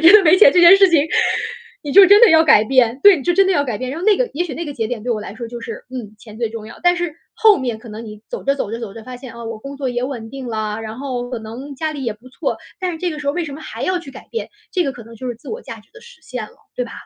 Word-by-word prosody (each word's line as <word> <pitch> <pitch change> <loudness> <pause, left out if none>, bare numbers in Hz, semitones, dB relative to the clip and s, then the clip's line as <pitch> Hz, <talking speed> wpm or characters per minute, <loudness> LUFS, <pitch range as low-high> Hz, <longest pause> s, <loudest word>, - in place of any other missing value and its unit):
你 - - +6
真 350 - +10
的 425 -2 +8
没 360 - +7
钱 325 -8 +7
这 355 - +5
件 345 +3 +9
事 390 0 +6
情， 325 -3 +5 0.8
你 290 - -5
就 400 0 +9
真 405 +3 +7
的 475 - +8
要 320 0 +6
改 240 -8 +6
变， 250 +1 +2
对， 405 -2 +8
你 280 - -6
就 350 - +1
真 385 +2 +4
的 385 - +2
要 285 - +2
改 240 -6 -3
变。 255 0 -4
然 295 - -5
后 360 - -5
那 425 -1 +4
个 - - +1
也 350 - 0
许 335 - -6
那 330 +5 -5
个 290 - -6
节 220 - -2
点 225 -2 -5
对 245 - -3
我 225 - 0
来 210 -1 -8
说 230 0 -7
就 240 0 -8
是： - - -7
“嗯， 240 -5 -8
钱 215 -1 -13
最 230 -2 -2
重 225 -1 -8
要。” 230 - -12
但 355 - +5
是 350 -3 -3 0.2
后 440 -2 +5
面 245 -4 -3
可 230 +1 -13
能 220 +2 -8
你 210 -1 -10
走 - - -6
着， 275 - +2
走 210 - -3
着， 230 - -4
走 230 -4 -7
着， 225 - -10
发 255 +2 -9
现， 250 0 -10
啊， 235 0 -9
我 225 -1 -6
工 275 +4 -9
作 270 -2 -2
也 245 0 -2
稳 245 -4 -6
定 265 +1 -8
了， 215 -1 -3
然 220 +2 -7
后 250 -3 -4
可 250 - -3
能 240 +6 -8
家 315 +3 -2
里 280 -3 -6
也 230 - -1
不 230 +5 -17
错， 255 - -3 0.2
但 365 -1 -1
是 325 - -7
这 355 0 -1
个 305 - -6
时 295 - -7
候 285 - +2
为 350 +2 -2
什 280 - -7
么 315 - -10
还 - - -7
要 370 -1 0
去 290 -6 -10
改 - - -13
变， 460 - -5 0.2
这 360 -3 0
个 275 - -2
可 240 -3 -12
能 230 +1 -13
就 255 - -7
是 245 - -3
自 - - -14
我 465 +3 -6
价 - - -9
值 - - -26
的 - - -14
实 475 -8 -16
现 250 -6 -6
了， - - -16 0.2
对 250 - -1
吧？ 230 - -10
260 Hz, 375 characters per minute, -19 LUFS, 230-340 Hz, 0.8 s, 真